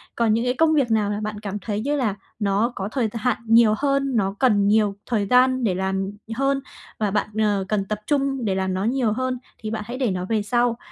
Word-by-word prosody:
Còn 230 -2 +2
những 230 +2 0
cái 250 - +1
công 315 +4 +3
việc 275 -6 +2
nào 215 -2 +2
mà 205 0 -2
bạn 215 0 -4
cảm 205 -1 -5
thấy 205 +1 -3
như 285 +5 0
là 235 -8 0 0.2
nó 205 +3 +1
có 195 +1 -4
thời 245 -3 0
th 210 - -15
hạn 230 0 0
nhiều 225 -1 +5
hơn, 275 0 +1
nó 195 -3 0
cần 205 -6 +3
nhiều 210 -1 +3
thời 215 -4 0
gian 255 +2 +4
để 195 -5 +1
làm 190 +1 -1 0.2
hơn, 275 +2 +1 0.4
và 210 -2 0
bạn, 210 +1 0
ờ, 205 -3 +1
cần 205 -1 0
tập 210 +1 -3
trung 275 -4 0
để 195 -2 0
làm 190 0 -1
nó 185 +1 -1
nhiều 240 0 +1
hơn 255 +2 -2 0.2
thì 215 - -5
bạn 220 -1 -3
hãy 245 +2 -5
để 255 -6 0
nó 180 -1 -3
về 220 -2 +1
sau. 240 +2 +1
220 Hz, 245 wpm, -23 LUFS, 205-255 Hz, 0.4 s, nhiều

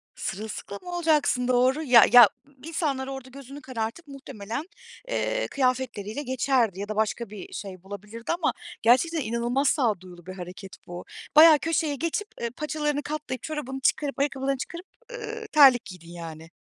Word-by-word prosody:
Sırılsıklam 200 -1 -6
olacaksın, 315 -8 +1
doğru. 255 +4 +2
Ya 245 -6 +7
ya, 240 -4 +10 0.3
insanlar 290 -5 -2
orada 265 -1 -7
gözünü 275 +2 -11
karartıp 245 +5 -5
muhtemelen, 270 -3 -6 0.4
eee, - - -1
kıyafetleriyle 255 -3 -1
geçerdi 255 -6 +1
ya 200 - -4
da 215 - -3
başka 220 +1 -1
bir 205 -3 -10
şey 185 -3 -7
bulabilirdi 210 +4 -7
ama 315 - +1 0.3
gerçekten 280 +8 +3
inanılmaz 240 +3 0
sağduyulu 185 - -1
bir 185 - -7
hareket 185 +1 -9
bu. 175 0 -8 0.3
Bayağı 310 0 +9
köşeye 320 -2 0
geçip, 335 +8 -2
eee, 235 - -1
paçalarını 300 +2 -2
katlayıp, 295 -4 -5
çorabını 285 -4 -4
çıkarıp, 280 +1 0
ayakkabılarını 275 -1 0
çıkarıp, 340 +7 -7 0.3
ııı, 455 -2 -6
terlik 270 -6 +7
giydin, 180 -4 -11
yani. 165 -1 -9
260 Hz, 145 wpm, -26 LUFS, 215-295 Hz, 0.4 s, ya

